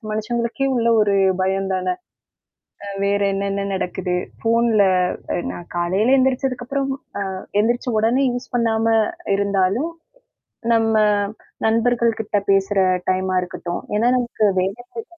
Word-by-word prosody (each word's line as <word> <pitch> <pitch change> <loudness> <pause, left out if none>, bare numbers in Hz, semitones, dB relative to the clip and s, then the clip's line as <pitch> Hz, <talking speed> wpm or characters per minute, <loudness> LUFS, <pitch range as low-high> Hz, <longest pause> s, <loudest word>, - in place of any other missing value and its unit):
மனுஷங்களுக்கே 235 +5 -1
உள்ள 235 0 +1
ஒரு 200 -1 +2 0.3
பயம்தானே? 190 - 0 1.1
வேற 200 0 +1
என்னென்ன 200 0 -2
நடக்குது, 180 -1 -2 0.3
போன்ல 230 -2 +3 0.7
நான் 175 - -9
காலையில 195 +10 +2
எந்திரிச்சதுக்கு 255 -1 0
அப்புறம், 275 -1 -1 0.4
அ - - -5 0.2
எந்திரிச்ச 240 +3 0
உடனே 245 +5 +2
யூஸ் 245 +1 -6
பண்ணாம 225 -1 +1 0.5
இருந்தாலும், 200 - +1 0.8
நம்ம 225 -1 +2 0.7
நண்பர்கள் 230 +1 +2
கிட்ட 210 -1 -1
பேசுற 195 +1 +2 0.3
டைம் 185 0 0
ஆ - - +2
இருக்கட்டும். 175 -1 -5
ஏன்னா 230 +3 +3
நமக்கு 235 -3 0
வேலை 195 +6 -2
செய்யறதே 455 - -5
220 Hz, 115 wpm, -21 LUFS, 195-240 Hz, 1.1 s, போன்ல